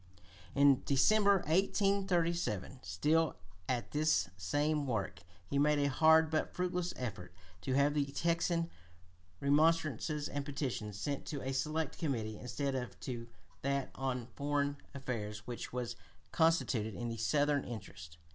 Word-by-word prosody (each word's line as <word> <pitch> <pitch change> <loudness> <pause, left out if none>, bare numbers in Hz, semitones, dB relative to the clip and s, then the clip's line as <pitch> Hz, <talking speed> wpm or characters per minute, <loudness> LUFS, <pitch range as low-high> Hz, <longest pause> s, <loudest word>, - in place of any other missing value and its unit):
In 140 -2 +5
December, 200 +8 +4
1837, 175 - +1
still 150 - +1 0.3
at 120 -2 -1
this 150 -10 +2
same 145 - 0
work, 115 -6 -2 0.3
he 140 +8 -1
made 150 +1 +4
a 140 0 +2
hard 160 +2 +5
but 155 - -1
fruitless 180 -1 -1
effort 95 -7 -6 0.3
to 130 - -2
have 140 +1 +4
the 145 -1 +1
Texan 170 +3 0 0.7
remonstrances 150 0 +2
and 145 0 -3
petitions 130 -8 -3
sent 140 +6 -3
to 145 -3 -4
a 135 +1 -2
select 155 +4 -1
committee 115 -9 -2
instead 140 +2 -2
of 125 -7 -4
to 120 -2 -5 0.3
that 140 0 -1
on 130 -3 -2
foreign 145 0 0 0.2
affairs 110 -6 -4
which 120 -1 -6
was 120 -1 -3 0.4
constituted 140 -10 +2
in 120 -1 -3
the 115 - -4
Southern 145 +4 +2
interest. 85 -8 -9
140 Hz, 135 wpm, -34 LUFS, 120-155 Hz, 0.7 s, In